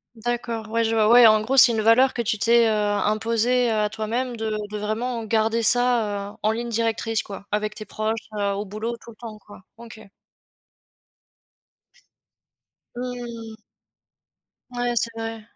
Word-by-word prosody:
D'accord, 230 -1 -4
ouais 230 0 +1
je 225 0 0
vois, 215 -1 +3
ouais 240 0 +8
en 215 0 +5
gros 255 +5 -1
c'est 245 -2 +8
une 220 -1 -1
valeur 245 +4 +4
que 235 - -1
tu 215 -1 -1
t'es, 235 0 +4
heu, - - +2
imposée, 220 +4 +1
heu, - - 0
à 210 -1 +1
toi-même 230 +3 -3
de 220 0 -3 0.2
de 210 - -4
vraiment 225 +3 -3
garder 225 +1 0
ça, 220 -4 +1
heu, - - -17
en 215 - +1
ligne 235 +1 -4
directrice 225 -1 -1
quoi, 200 -1 -10
avec 210 0 -2
tes 215 - -8
proches, 220 +1 -4
heu, 200 -1 -1
au 205 +1 -4
boulot 220 +4 -5
tout 235 - -13
le - - -17
temps 225 -3 -9
quoi. 205 -1 -16 0.2
OK. 230 -2 -12 2.9
Mmh. 240 -3 -7 1.2
Ouais 245 0 -2
c'est 230 +1 0
vrai, 225 0 -5
225 Hz, 165 wpm, -23 LUFS, 215-235 Hz, 2.9 s, ouais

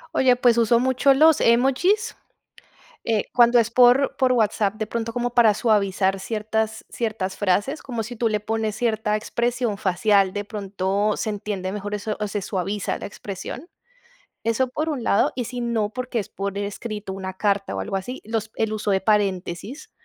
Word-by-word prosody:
Oye, 255 -1 +4
pues, 245 -1 +3
uso 230 +1 +4
mucho 260 +2 +3
los 315 +2 +5
emojis. 270 - +2 0.9
Eh, 220 -3 +1
cuando 240 0 +6
es 230 -1 +2
por 250 +3 +5
por 260 -1 +3
WhatsApp, 215 -3 +1
de 215 0 -4
pronto 230 +1 -4
como 245 0 -1
para 230 -4 +5
suavizar 195 -3 +1
ciertas 220 +1 -2
ciertas 210 -5 -3
frases, 205 +9 0
como 240 -4 -4
si 230 +3 -7
tú 230 0 0
le 210 -1 -1
pones 220 0 -2
cierta 220 -2 0
expresión 235 0 -1
facial, 195 0 +2
de 205 0 -3
pronto 200 0 -1
se 220 - -2
entiende 200 -2 -4
mejor 205 0 -4
eso, 210 +1 -3
o 210 - -1
se 205 0 -3
suaviza 195 +1 -2
la - - -6
expresión. 205 - -7 0.8
Eso 230 +3 +1
por 300 +5 -3
un 285 -7 -2
lado. 200 - +2
Y 245 - -3
si 245 +1 -5
no, 230 -3 0
porque 250 +1 -3
es 205 - -5
por 200 0 -4
escrito 205 0 -5
una 190 -1 -5
carta 200 - 0
o - - -3
algo 95 - -3
así, 220 +7 -5
los 220 0 -3
el 220 -1 -1
uso 215 -1 -1
de 190 -1 +2
paréntesis 200 - -1
220 Hz, 180 wpm, -23 LUFS, 200-240 Hz, 0.9 s, cuando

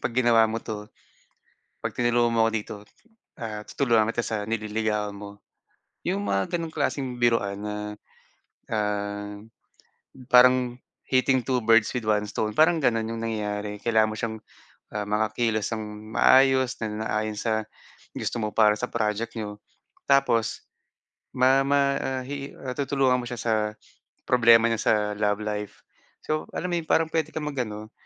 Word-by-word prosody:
"Pag 120 - -2
ginawa 120 -3 +5
mo 115 - -2
'to, 105 -1 -7 0.9
'pag - - -2
tinulungan 120 -1 +2
mo 115 - +4
'ko - - -1
dito, 110 -1 -3 0.6
ah, 105 -2 -5
tutulungan 115 -6 +2
kita - - 0
sa 110 - -2
nililigawan 110 -1 -1
mo." 100 0 -10 0.7
'Yong 100 - 0
mga 100 -1 +1
ganong 165 -2 -5
klaseng 140 -3 -1
biruan 105 -4 +1
na, 105 0 -4 0.9
ah, 105 -1 -2 0.9
parang 125 0 +5 0.3
hitting 130 -1 +2
two 125 0 0
birds 115 -1 +4
with 120 -4 -3
one 105 -1 +2
stone 105 +1 -3
parang 160 +1 +4
gano'n 115 -5 +1
'yong 115 0 -4
nangyari. 105 -2 -3
Kailangan 110 0 +2
mo 110 - -5
siyang, 110 0 -3 0.6
ah, 105 -1 -2
makakilos 110 +1 0
nang 110 - -4 0.3
maayos 130 -1 +4
na - - 0 0.2
naayon 110 -1 -1
sa 110 0 -1 0.5
gusto - - -3
mo 105 -2 -2
para 105 -1 +4
sa 125 - -2
project 110 0 -2
n'yo. 105 -2 -5 0.5
Tapos 125 -6 +2 0.7
ma 130 +2 +5
ma 140 0 +2
ah, 130 -1 -2
he 140 +1 -6
ah, 130 -1 -4
tutulungan 135 -2 +1
mo 120 - -7
siya 120 - -5
sa 115 - 0 0.8
problema 115 -2 +6
niya 115 -1 -1
sa - - +3 0.2
love 105 0 0
life. 105 -1 -5 0.4
So 155 0 -2
alam 180 - -2
mo - - +1
yun, 160 - -9
parang 160 - +3
puwede 160 -1 -1
kang 155 - -3
mag-ano, 110 -6 -4
115 Hz, 155 wpm, -25 LUFS, 105-130 Hz, 0.9 s, problema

